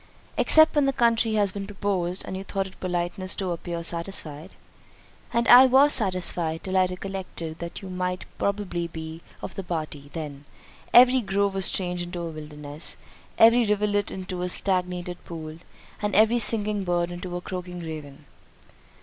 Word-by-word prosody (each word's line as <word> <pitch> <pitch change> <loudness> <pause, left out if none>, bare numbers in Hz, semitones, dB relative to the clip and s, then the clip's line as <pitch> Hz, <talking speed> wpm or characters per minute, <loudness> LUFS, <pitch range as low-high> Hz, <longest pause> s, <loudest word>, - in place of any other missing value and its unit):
"Except 315 0 +7
when 290 -2 +2
the 275 - +1
country 230 -2 +2
has 205 -2 +2
been 195 0 -6
proposed, 195 -3 -2
and - - -5
you 190 - -5
thought 195 0 -3
it 190 - -13
politeness 180 +1 -1
to 190 -2 -2
appear 170 0 -5
satisfied." 165 -3 -3 0.8
"And 235 0 0
I 255 +2 +9
was 275 +3 +5
satisfied, 180 -6 +1
till 190 0 -3
I 185 -1 +4
recollected 180 -3 -6
that 170 +3 -7
you 190 - -7
might 180 0 -3
probably 200 -4 -2
be 160 0 -8 0.2
of - - -6
the - - -5
party—then, 150 -3 -6 0.5
every 250 +1 +7
grove 200 -1 0
was 195 -1 +2
changed 180 -2 -2
into 175 0 -5
a 165 - -4
wilderness, 150 0 -3 0.4
every 230 +2 +6
rivulet 205 -1 0
into 185 -1 -6
a 180 - -2
stagnated 180 -2 -2
pool, 160 -1 -8 0.4
and 210 -1 -1
every 220 +3 +4
singing 210 -2 +1
bird 175 -1 -1
into 175 0 -6
a - - -6
croaking 180 -1 -6
raven." 150 -3 -8
185 Hz, 160 wpm, -25 LUFS, 170-205 Hz, 0.8 s, I